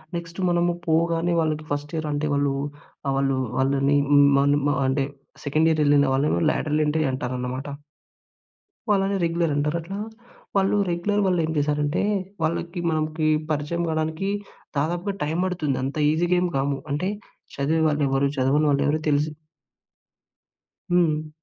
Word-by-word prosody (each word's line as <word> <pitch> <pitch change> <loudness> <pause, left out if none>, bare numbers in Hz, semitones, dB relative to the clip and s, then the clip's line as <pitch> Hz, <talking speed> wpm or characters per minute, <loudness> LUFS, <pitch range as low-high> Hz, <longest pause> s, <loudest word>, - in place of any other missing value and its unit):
Next 170 +1 -6
మనము 175 0 +2 0.2
పోగానే 165 +1 +2
వాళ్ళకి 155 -1 0
ఫస్ట్ 145 +2 -3
ఇయర్ 155 -1 -2
అంటే 145 +1 -1
వాళ్ళు 140 -1 +1 0.6
ఆహ్, 135 - +1 0.4
వాళ్ళని 135 +1 +2 0.4
మనం 145 +1 +3 0.3
అంటే 135 +1 +1 0.4
సెకండ్ 155 +3 +3
ఇయర్ 155 -1 +2
వెళ్ళిన 145 0 +4
వాళ్ళని 135 - +1
లాడర్ 150 0 -1
ఎంట్రీ 155 +1 +1
అంటారనమాట. 125 +1 -4 1.2
వాళ్ళని 195 -1 +2
రెగ్యులర్ 165 -1 +1
అంటారు. 150 +3 0
అట్లా 190 +5 -7 0.6
వాళ్ళు 195 +1 +2
రెగ్యులర్ 205 +5 0
వాళ్లేం 170 -4 +1
చేశారంటే, 145 +2 0 0.4
వాళ్ళకి 170 +2 -2
మనకి 155 0 0 0.2
పరిచయం 155 +3 -1
కావడానికి 160 +4 -1 0.5
దాదాపుగా 175 +7 -1
టైమ్ 160 +4 -1
పడుతుంది. 160 -7 -1
అంత 135 +3 -3
ఈజీగేం 175 +2 +2
కాము. 140 0 0
అంటే 165 +7 -1 0.5
చదివే 155 +4 +1
వాళ్ళు 150 0 0
ఎవరు? 135 +1 +2
చదవని 140 +4 +2
వాళ్ళు 140 - +2
ఎవరు? 150 - +2
తెలిసి 145 +1 +2 1.6
హ్మ్. 155 -3 +2
155 Hz, 130 wpm, -24 LUFS, 145-170 Hz, 1.6 s, వెళ్ళిన